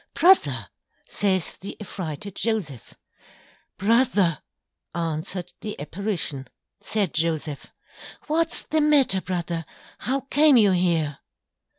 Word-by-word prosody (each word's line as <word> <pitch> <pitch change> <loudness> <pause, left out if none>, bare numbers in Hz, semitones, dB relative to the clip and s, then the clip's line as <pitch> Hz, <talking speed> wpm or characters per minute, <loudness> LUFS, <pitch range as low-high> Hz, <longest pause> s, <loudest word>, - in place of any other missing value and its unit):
Brother! 375 +2 +4 0.4
says 190 -4 0
the 195 - -8
Affrighted 190 -2 -6
Joseph. 185 - -2 0.8
Brother! 205 - +2 0.5
Answered 170 +2 -3
the 210 - -6
Apparition. 150 - -3 0.3
Said 205 -6 -1
Joseph, 155 -3 -1 0.6
_What's 330 +2 +1
the 315 0 +1
matter 280 -10 +4
Brother? 170 -3 -3 0.4
How 270 +2 -1
came 290 +1 +5
you 210 -4 +5
here! 170 -5 +1
190 Hz, 95 wpm, -24 LUFS, 165-230 Hz, 0.8 s, came